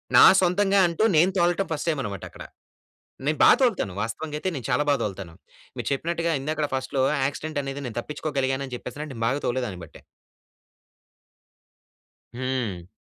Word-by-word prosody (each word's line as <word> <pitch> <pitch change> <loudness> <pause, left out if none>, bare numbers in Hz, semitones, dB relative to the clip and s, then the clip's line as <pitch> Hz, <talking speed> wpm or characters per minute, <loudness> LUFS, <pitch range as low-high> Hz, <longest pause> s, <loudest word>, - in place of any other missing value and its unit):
నా - - +10
సొంతంగా 195 +2 +3
అంటూ, 170 +5 -1
నేను 170 +5 +5
తోలటం 175 +2 +2
ఫస్ట్ 155 +2 -3
టైమ్ 155 -4 0
అన్నమాట 100 -5 -5
అక్కడ. - - -11 0.8
నేను 155 +1 +1
బాగా - - +8
తోలుతాను 200 - +1
వాస్తవంగా 150 +8 -4
అయితే, 185 - -1
నేను 130 -5 -6
చాలా 150 - +2
బాగా 140 -3 +3
తోలుతాను. 95 -4 -5 0.4
మీకు - - -5
చెప్పినట్టుగా, 165 +3 -1
ఇందాకడ 150 +1 -1
ఫస్ట్‌లో 130 0 -1 0.2
యాక్సిడెంట్ 150 +2 -3
అనేది 135 +1 -5
నేను 120 - -8
తప్పించుకోగలిగాను 140 -1 -2
అని 125 - -6
చెప్పేసి 125 +2 -8
అంటే, 155 - -10
నేను 115 -2 -2
బాగా 135 +4 0
తోలేదాన్ని 120 -7 -2
బట్టే. - - -16 2.3
హ్మ్. 120 -9 -3
140 Hz, 155 wpm, -25 LUFS, 125-160 Hz, 2.3 s, నా